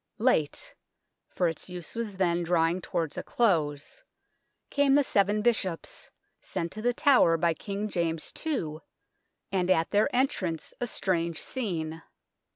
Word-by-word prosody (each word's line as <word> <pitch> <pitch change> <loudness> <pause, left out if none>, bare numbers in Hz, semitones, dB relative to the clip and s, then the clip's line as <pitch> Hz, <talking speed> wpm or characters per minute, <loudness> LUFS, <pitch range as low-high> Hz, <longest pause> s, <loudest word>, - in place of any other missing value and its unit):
Late 185 - +1 0.6
for 180 - +1
its 165 +2 -4
use 180 -3 -7
was 225 -4 -4
then 175 -2 +2
drawing 170 +1 +2
towards 165 -3 -2
a - - -5
close 170 - 0 0.7
came 285 -1 +4
the 290 - +5
Seven 205 -3 +2
Bishops, 200 -8 -1 0.3
sent 170 0 -4
to 215 - -7
The 245 +2 +2
Tower 250 - +5
by 165 0 +2
King 200 +4 -4
James 165 -5 -2
II, 170 - -2 0.7
and 185 -2 0
at 165 -3 +3
then* 210 +1 +4
entrance 190 - -1
a 245 - 0
strange 170 -6 -1
scene. 165 -10 -3
180 Hz, 140 wpm, -28 LUFS, 165-220 Hz, 0.7 s, the